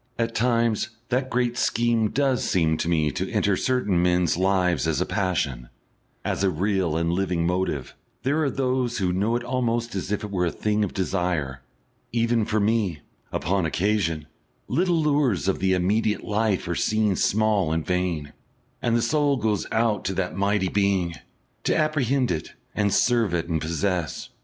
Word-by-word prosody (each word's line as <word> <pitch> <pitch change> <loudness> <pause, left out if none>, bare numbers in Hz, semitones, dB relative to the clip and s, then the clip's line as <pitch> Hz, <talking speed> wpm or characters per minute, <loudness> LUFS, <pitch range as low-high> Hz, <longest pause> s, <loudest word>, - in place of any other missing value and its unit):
At 115 0 -1
times 115 -1 +1 0.2
that 130 +1 0
great 120 0 0
scheme 115 -2 +2
does 135 -1 +1
seem 80 -3 +2
to 85 - -2
me 80 -3 +2
to - - -3
enter 100 -1 +2
certain 105 -7 +1
men's 90 -1 +2
lives 90 -4 +1
as - - +1
a - - +1
passion, 75 - -1 0.6
as - - -1
a 95 - +4
real 90 -2 0
and 85 +1 0
living 90 -2 0
motive; 90 -6 -1 0.3
there 145 +4 +1
are 140 - +2
those 130 -2 -1
who 90 -4 0
know 105 +6 +1
it 120 - -1
almost 120 -2 -1
as 95 0 -4
if 105 - -1
it 105 - -5
was 90 -3 0
a - - -17
thing 105 0 +1
of 100 - -3
desire; 85 -8 -1 0.5
even 115 -1 +1
for 110 0 0
me, 100 -7 +1 0.3
upon 95 +3 0
occasion, 85 -2 0 0.4
the - - -6
little 175 +3 +2
lures 145 - +1
of 95 - +1
the 95 -1 +2
immediate 105 +4 +1
life 105 -3 0
are 85 - -1
seen 105 +2 +1
small 105 -4 +2
and 80 -1 -1
vain, 90 -5 -1 0.5
and 120 -1 +2
the 115 - 0
soul 145 +2 +2
goes 105 -4 -1
out 110 -2 +1
to 95 - -1
that 90 -1 -2
mighty 100 0 +1
Being, 95 -3 +1 0.5
to - - +2
apprehend 140 -5 +1
it 80 -3 -4 0.2
and 105 -1 +1
serve 115 -2 +2
it 85 -1 -2
and 80 -2 -1
possess. 85 0 -2
100 Hz, 175 wpm, -24 LUFS, 90-115 Hz, 0.6 s, a